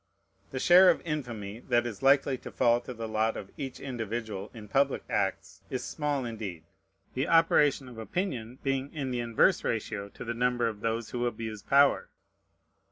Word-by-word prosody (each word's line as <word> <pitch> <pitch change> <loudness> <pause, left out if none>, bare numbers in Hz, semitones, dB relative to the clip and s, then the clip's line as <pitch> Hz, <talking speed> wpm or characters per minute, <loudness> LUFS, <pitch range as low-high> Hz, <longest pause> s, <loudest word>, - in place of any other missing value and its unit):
The 130 - -6
share 180 +7 +7
of 175 - +2
infamy 120 -9 -4
that 120 -1 +1
is 115 -4 -5
likely 135 0 +4
to - - -9
fall 120 0 +3
to 125 - -8
the 115 -2 -5
lot 110 +1 0
of 95 - -8
each 135 -2 -6
individual 115 -5 -4
in 110 -3 -10
public 135 +5 +1
acts - - -2
is - - -3
small 145 -3 -2
indeed: 105 -8 -6 0.5
the 135 +4 -1
operation 150 -5 +4
of 120 -3 -10
opinion 125 - -3
being 135 0 -1
in 135 -4 -3
the 125 - -1
inverse 120 - +3
ratio 105 -2 -3
to - - -10
the 115 - -2
number 120 0 +1
of 110 -2 -4
those 115 +1 -2
who 120 0 -1
abuse 110 -2 -5
power. 140 +4 +4
120 Hz, 175 wpm, -29 LUFS, 110-135 Hz, 0.5 s, share